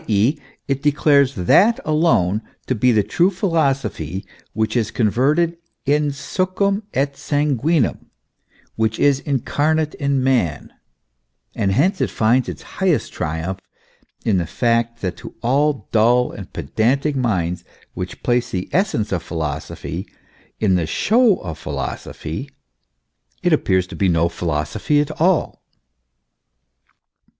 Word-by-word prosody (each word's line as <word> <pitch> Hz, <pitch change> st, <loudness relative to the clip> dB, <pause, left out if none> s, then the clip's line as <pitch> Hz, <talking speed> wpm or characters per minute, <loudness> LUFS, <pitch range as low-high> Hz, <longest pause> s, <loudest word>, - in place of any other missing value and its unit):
e., 110 Hz, +7 st, +3 dB, 0.3 s
it 135 Hz, -1 st, -1 dB
declares 145 Hz, -2 st, +3 dB
that 195 Hz, -, +4 dB
alone 150 Hz, -, +2 dB, 0.2 s
to -, -, 0 dB
be 125 Hz, +2 st, +3 dB
the 110 Hz, -3 st, +3 dB
true 175 Hz, -, +2 dB
philosophy 140 Hz, -, -1 dB, 0.3 s
which 110 Hz, +1 st, -1 dB
is 115 Hz, -3 st, +1 dB
converted 135 Hz, +10 st, +1 dB, 0.3 s
in 150 Hz, +1 st, +2 dB
succwn 185 Hz, +8 st, -1 dB
et 140 Hz, +1 st, +1 dB
sanguinem, 145 Hz, 0 st, 0 dB, 0.7 s
which 110 Hz, 0 st, 0 dB
is 140 Hz, -2 st, +3 dB
incarnate 150 Hz, +3 st, 0 dB
in 140 Hz, -2 st, 0 dB
Man; 120 Hz, -, 0 dB, 0.8 s
and 95 Hz, -, 0 dB
hence 180 Hz, -, +2 dB
it -, -, +1 dB
finds 115 Hz, +1 st, +2 dB
its 80 Hz, -6 st, -7 dB, 0.2 s
highest -, -, +1 dB
triumph 80 Hz, +4 st, -3 dB, 0.7 s
in 100 Hz, -4 st, +3 dB
the 85 Hz, -, -2 dB
fact 115 Hz, +1 st, 0 dB
that 90 Hz, -2 st, -3 dB
to -, -, -10 dB
all 140 Hz, -1 st, +1 dB
dull 120 Hz, +3 st, +3 dB
and 95 Hz, -2 st, -9 dB
pedantic 125 Hz, -, 0 dB
minds, 95 Hz, -9 st, -1 dB, 0.3 s
which 90 Hz, -1 st, -6 dB
place 125 Hz, 0 st, +1 dB
the 90 Hz, -1 st, -4 dB
essence 180 Hz, -, 0 dB
of 90 Hz, -4 st, 0 dB
philosophy 80 Hz, -4 st, -5 dB, 0.5 s
in 100 Hz, -4 st, +2 dB
the 85 Hz, -3 st, +1 dB
show 225 Hz, -, +3 dB
of 80 Hz, -4 st, -6 dB
philosophy, -, -, -5 dB, 0.9 s
it 175 Hz, -2 st, +3 dB
appears 95 Hz, -11 st, +2 dB
to -, -, -10 dB
be 95 Hz, -, +1 dB
no 85 Hz, 0 st, +2 dB
philosophy 85 Hz, -, -1 dB
at 150 Hz, +1 st, 0 dB
all. 180 Hz, 0 st, +2 dB
125 Hz, 125 wpm, -20 LUFS, 95-150 Hz, 0.9 s, that